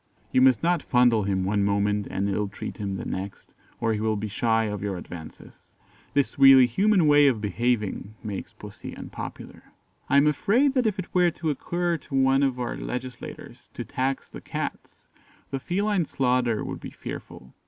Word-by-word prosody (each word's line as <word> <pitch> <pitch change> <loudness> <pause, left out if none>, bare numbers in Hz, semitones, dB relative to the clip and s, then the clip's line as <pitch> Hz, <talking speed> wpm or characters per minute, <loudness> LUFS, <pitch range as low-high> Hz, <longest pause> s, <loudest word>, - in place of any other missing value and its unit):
You 130 - +4
must 130 +1 +5
not 175 -1 +2
fondle 120 -4 +3
him 95 -2 0
one 100 +1 +1
moment 100 0 +1
and 100 +1 -1
illtreat 100 0 -3
him 100 -2 -3
the - - -5
next, 95 +1 -6 0.3
or 115 -1 +1
he 105 - -2
will 110 0 0
be 105 +1 -3
shy 115 +1 +1
of 105 -2 -3
your 100 -2 -3
advances. 85 -2 -11 0.4
This 140 0 +1
really 135 -2 +9
human 190 - +3
way 145 -1 +6
of 125 -5 +2
behaving 105 0 -1
makes 105 -3 -5
Pussy - - -10
unpopular. - - -9 0.4
I 140 - +4
am 140 - +6
afraid 225 - +3
that 255 -4 +2
if 210 -1 -1
it 185 - -6
were 180 -1 +4
to 160 -1 -2
occur 175 +3 -1
to 140 - -7
one 135 0 +4
of 135 -3 +1
our 120 - -2
legislators 125 0 -7
to - - -5
tax 135 +1 -2
the - - -10
Cats, - - -6 0.5
the 135 - -2
feline 195 +4 0
slaughter 125 -4 +1
would - - -5
be - - -8
fearful. 65 -1 -9
125 Hz, 180 wpm, -25 LUFS, 105-145 Hz, 0.5 s, really